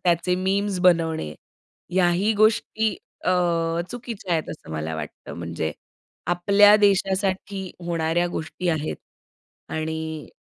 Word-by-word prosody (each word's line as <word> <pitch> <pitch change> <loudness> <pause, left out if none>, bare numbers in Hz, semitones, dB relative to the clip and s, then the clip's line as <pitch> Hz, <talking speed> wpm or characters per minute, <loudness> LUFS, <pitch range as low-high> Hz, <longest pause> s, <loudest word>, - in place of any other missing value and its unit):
त्याचे 175 +1 +2
मीम्स 195 +1 0
बनवणे. 165 - +3 0.6
ह्याही 185 +3 +3
गोष्टी 215 +1 +3 0.4
अ, - - +2 0.6
चुकीच्या 230 -6 -5
आहेत, 160 -2 0
असं 155 - -10
मला 80 +1 -3
वाटतं. - - -7
म्हणजे 85 -2 -3 0.5
आपल्या 200 +4 +6
देशासाठी 195 -1 +1 0.2
होणाऱ्या 165 0 +1
गोष्टी 175 +2 -4
आहेत 155 -2 -1 0.8
आणि 160 -1 -3
175 Hz, 105 wpm, -24 LUFS, 160-200 Hz, 0.8 s, आपल्या